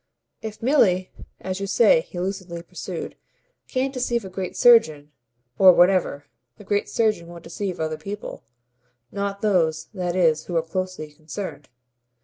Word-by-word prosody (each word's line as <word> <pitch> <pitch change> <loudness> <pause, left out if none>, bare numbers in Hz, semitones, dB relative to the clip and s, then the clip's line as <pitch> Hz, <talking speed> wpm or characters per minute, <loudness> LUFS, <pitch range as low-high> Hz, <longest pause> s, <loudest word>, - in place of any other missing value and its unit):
If 220 0 -8
Milly, 195 -9 +3 0.3
as 185 0 -4
you 195 - -3
say," 200 -3 +5
he 175 +1 -9
lucidly 180 -2 -4
pursued, 180 -1 -7 0.5
"can't 265 +1 -1
deceive 240 -4 -1
a - - -7
great 185 -1 -5
surgeon, 155 -12 +5 0.5
or 185 -1 +9
whatever, 175 -5 +3 0.3
the - - -13
great 205 +1 -1
surgeon 215 -7 0
won't 170 -1 -11
deceive 185 +2 -5
other 155 -1 -2
people 205 +1 -7 0.7
not 200 0 -3
those, 160 -6 +1
that 180 -3 -3
is, 160 -4 +2
who 175 - -5
are 165 - +1
closely 185 -2 -4
concerned. 155 0 -8
185 Hz, 145 wpm, -23 LUFS, 165-205 Hz, 0.7 s, or